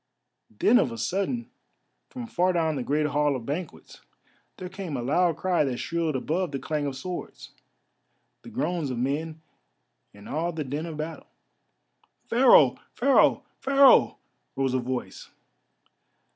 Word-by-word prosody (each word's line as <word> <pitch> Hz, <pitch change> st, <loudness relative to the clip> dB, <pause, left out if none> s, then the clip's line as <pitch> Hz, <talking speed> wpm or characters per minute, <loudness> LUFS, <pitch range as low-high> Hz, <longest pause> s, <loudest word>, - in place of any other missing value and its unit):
Then 215 Hz, -, +3 dB
of 125 Hz, -, +1 dB
a 115 Hz, -, -7 dB
sudden, 200 Hz, -, -2 dB, 0.6 s
from 250 Hz, -2 st, -7 dB
far 185 Hz, -4 st, +1 dB
down 160 Hz, -3 st, 0 dB
the 135 Hz, -, -3 dB
great 150 Hz, +4 st, 0 dB
hall 150 Hz, -1 st, +1 dB
of 120 Hz, -3 st, -6 dB
banquets, 155 Hz, +5 st, -6 dB, 0.6 s
there 185 Hz, -, -6 dB
came 185 Hz, -6 st, -6 dB
a -, -, -3 dB
loud 165 Hz, +5 st, +1 dB
cry 180 Hz, -3 st, +1 dB
that 130 Hz, -4 st, -2 dB
shrilled 165 Hz, -1 st, -2 dB
above 165 Hz, +6 st, -1 dB
the 140 Hz, -, -3 dB
clash 150 Hz, +1 st, -3 dB
of 140 Hz, -2 st, -3 dB
swords, 180 Hz, +7 st, -7 dB, 0.9 s
the -, -, -12 dB
groans 180 Hz, -, -2 dB
of 125 Hz, -, -4 dB
men, 155 Hz, +5 st, -3 dB, 0.7 s
and 100 Hz, 0 st, -14 dB
all 170 Hz, +4 st, -2 dB
the 155 Hz, -1 st, -3 dB
din 145 Hz, +5 st, -4 dB
of 160 Hz, -2 st, -7 dB
battle. 155 Hz, +1 st, -6 dB, 1.0 s
"Pharaoh! 230 Hz, -, +5 dB, 0.2 s
Pharaoh! 270 Hz, +2 st, +4 dB, 0.2 s
Pharaoh!" 275 Hz, 0 st, +5 dB, 0.4 s
rose 135 Hz, -1 st, 0 dB
a 130 Hz, -, +1 dB
voice. 125 Hz, 0 st, -5 dB
155 Hz, 145 wpm, -26 LUFS, 135-180 Hz, 1.0 s, Pharaoh